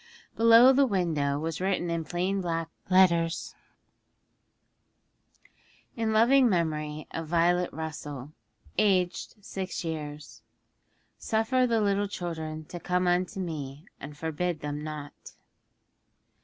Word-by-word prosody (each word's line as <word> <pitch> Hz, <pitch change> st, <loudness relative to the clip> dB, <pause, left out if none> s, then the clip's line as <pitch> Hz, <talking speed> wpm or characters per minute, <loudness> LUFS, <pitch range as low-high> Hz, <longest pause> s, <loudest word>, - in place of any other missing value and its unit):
Below 230 Hz, +3 st, +7 dB
the 275 Hz, +1 st, +4 dB
window 160 Hz, -, 0 dB
was 160 Hz, +2 st, -4 dB
written 185 Hz, -2 st, 0 dB
in 165 Hz, -1 st, -1 dB
plain 185 Hz, +4 st, -1 dB
black 165 Hz, -2 st, -2 dB, 0.2 s
letters, 170 Hz, -3 st, +3 dB, 2.4 s
IN 225 Hz, -1 st, -1 dB
LOVING 240 Hz, +4 st, +5 dB
MEMORY 155 Hz, -4 st, -1 dB
OF 165 Hz, -1 st, -5 dB
VIOLET 175 Hz, +2 st, +2 dB
RUSSELL. 150 Hz, -3 st, -6 dB, 0.5 s
Aged 185 Hz, -2 st, +1 dB
six 190 Hz, -2 st, -4 dB
years. 150 Hz, -2 st, -6 dB, 0.8 s
'_Suffer 245 Hz, +3 st, +1 dB
the 225 Hz, -1 st, +2 dB
little 200 Hz, 0 st, +1 dB
children 160 Hz, -5 st, -5 dB
to 175 Hz, -, -8 dB
come 180 Hz, +2 st, 0 dB
unto 180 Hz, +2 st, 0 dB
Me, 150 Hz, -4 st, -5 dB
and 145 Hz, +1 st, -9 dB
forbid 160 Hz, +2 st, -2 dB
them 145 Hz, 0 st, -4 dB
not. 150 Hz, -1 st, -8 dB
175 Hz, 110 wpm, -28 LUFS, 155-195 Hz, 2.4 s, Below